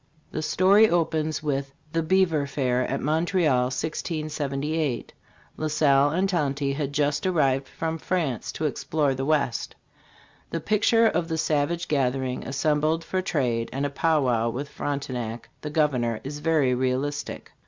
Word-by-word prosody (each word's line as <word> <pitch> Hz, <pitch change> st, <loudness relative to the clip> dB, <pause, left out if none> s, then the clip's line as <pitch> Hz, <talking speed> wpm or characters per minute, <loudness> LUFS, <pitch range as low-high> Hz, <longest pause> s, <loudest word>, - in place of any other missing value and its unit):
The 155 Hz, -, -3 dB
story 195 Hz, +7 st, +5 dB
opens 160 Hz, -2 st, 0 dB
with 140 Hz, -2 st, -1 dB, 0.2 s
the 165 Hz, -, +2 dB
"Beaver 165 Hz, -4 st, +2 dB
Fair" 130 Hz, -2 st, 0 dB
at -, -, -2 dB
Montreal, 155 Hz, -4 st, +2 dB
1678. 150 Hz, 0 st, -2 dB, 0.4 s
La 155 Hz, -, -1 dB
Salle 145 Hz, -2 st, +4 dB
and 185 Hz, +6 st, +1 dB
Tonty 140 Hz, -6 st, 0 dB
had 140 Hz, -1 st, -2 dB
just 145 Hz, +2 st, 0 dB
arrived 135 Hz, -6 st, +2 dB
from 165 Hz, +3 st, -4 dB
France 155 Hz, -9 st, -1 dB
to 155 Hz, -, -3 dB
explore 150 Hz, -1 st, 0 dB
the 135 Hz, +1 st, -3 dB
West. 140 Hz, -6 st, 0 dB, 0.7 s
The 165 Hz, -, -2 dB
picture 215 Hz, +5 st, +3 dB
of 175 Hz, -6 st, +1 dB
the 160 Hz, -1 st, -2 dB
savage 160 Hz, +3 st, 0 dB
gathering 130 Hz, -2 st, 0 dB
assembled 150 Hz, +4 st, +1 dB
for 185 Hz, +3 st, -1 dB
trade 125 Hz, -10 st, -1 dB
and 135 Hz, +2 st, -2 dB
a 145 Hz, -, -2 dB
pow 155 Hz, 0 st, +2 dB
wow 115 Hz, -2 st, +1 dB
with 140 Hz, +5 st, -4 dB
Fronte 140 Hz, -2 st, -3 dB
nac, 115 Hz, -1 st, -5 dB
the 150 Hz, -, -4 dB
governor, 130 Hz, -7 st, +1 dB
is 145 Hz, +2 st, -6 dB
very 150 Hz, -4 st, +2 dB
realistic. 130 Hz, +3 st, -2 dB
145 Hz, 150 wpm, -25 LUFS, 135-160 Hz, 0.7 s, story